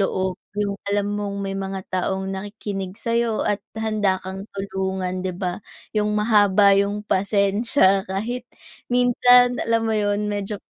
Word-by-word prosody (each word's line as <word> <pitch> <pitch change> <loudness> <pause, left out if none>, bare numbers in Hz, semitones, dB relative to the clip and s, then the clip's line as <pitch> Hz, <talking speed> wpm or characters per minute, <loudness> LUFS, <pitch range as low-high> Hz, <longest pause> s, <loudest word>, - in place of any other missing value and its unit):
loob, 190 -1 -1 0.2
yung 200 -1 -1
alam 205 0 0
mong 205 -1 -3
may 195 - -3
mga 195 0 -4
taong 190 +1 -1
nakikinig 195 -1 -5
sa'yo 230 -1 0
at 205 - +1 0.2
handa 215 -3 +1
kang 190 +1 -7
tulungan 190 -1 -2
di 185 -1 -3
ba? 180 -1 -3 0.3
Yung 210 -1 0
mahaba 205 -2 +5
yung 200 +1 0
pasensya 200 +1 +2
kahit 235 +6 -3 0.4
minsan 245 0 +4
alam 230 0 +1
mo 225 - 0
yun 205 0 0
medyo 205 0 -3
200 Hz, 140 wpm, -22 LUFS, 190-215 Hz, 0.4 s, mahaba